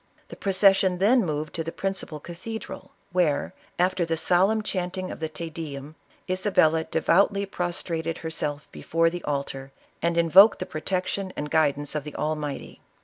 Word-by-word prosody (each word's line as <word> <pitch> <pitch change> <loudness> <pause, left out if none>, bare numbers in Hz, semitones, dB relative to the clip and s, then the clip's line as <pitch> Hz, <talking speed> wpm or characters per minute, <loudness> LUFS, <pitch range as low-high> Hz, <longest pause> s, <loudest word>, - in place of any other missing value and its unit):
The - - -8
procession 195 -1 +3
then 225 +6 +4
moved 155 -2 -3
to 165 - -3
the 165 - -5
principal 190 -6 -3
cathedral, 185 +8 -8 0.2
where, 170 -5 +1 0.2
after 180 0 +2
the 165 -1 -1
solemn 195 +6 +2
chanting 185 -1 -3
of - - -8
the 160 -1 -3
Te 165 +1 -7
Dcum, 150 -2 -7 0.3
Isabella 185 -4 +2
devoutly 200 +5 +2
prostrated 170 -3 -3
herself 150 -3 -4
before 165 0 +1
the 175 0 -6
altar 140 -2 -3 0.3
and 170 +1 0
invoked 185 +6 +7
the - - -4
protection 185 +4 -2
and 150 0 -4
guidance 145 -2 +1
of 150 -2 -2
the 150 0 -9
Almighty. 150 -2 -4
170 Hz, 150 wpm, -26 LUFS, 155-185 Hz, 0.3 s, invoked